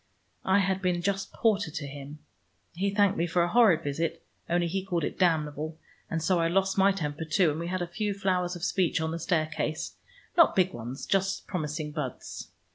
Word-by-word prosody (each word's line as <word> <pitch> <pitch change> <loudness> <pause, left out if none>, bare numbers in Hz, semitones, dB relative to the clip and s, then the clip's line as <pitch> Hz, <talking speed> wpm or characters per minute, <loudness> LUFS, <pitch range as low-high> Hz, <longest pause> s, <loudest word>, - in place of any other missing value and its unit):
I 190 +1 +4
had 190 -1 +1
been 180 -2 0
just 195 +1 -1
porter 205 -5 +1
to 150 -1 -5
him. 140 +1 -8 0.6
He 195 +4 0
thanked 200 -1 +3
me 170 - +1
for 175 +1 +2
a - - +1
horrid 210 -9 +5
visit, 165 +3 -2 0.2
only 175 0 +2
he 185 +3 -2
called 175 -4 -1
it - - -3
damnable, 155 -3 +1 0.3
and 165 -1 -2
so 180 0 +2
I 165 - +2
lost 190 +2 +1
my 195 0 +5
temper, 155 -5 -3
too, 160 +1 +3
and 150 - -4
we 170 - -3
had 185 0 -1
a - - -4
few 205 +3 -2
flowers 185 -2 0
of 175 - -8
speech 185 -3 +1
on 160 0 -1
the 165 - -3
staircase, 155 -2 -1 0.4
not 335 -2 +6
big 185 -1 +3
ones, 120 +3 -6
but - - -13
just 195 -1 +1
promising 155 -3 -3
buds. 145 -5 -5
175 Hz, 205 wpm, -28 LUFS, 155-190 Hz, 0.6 s, not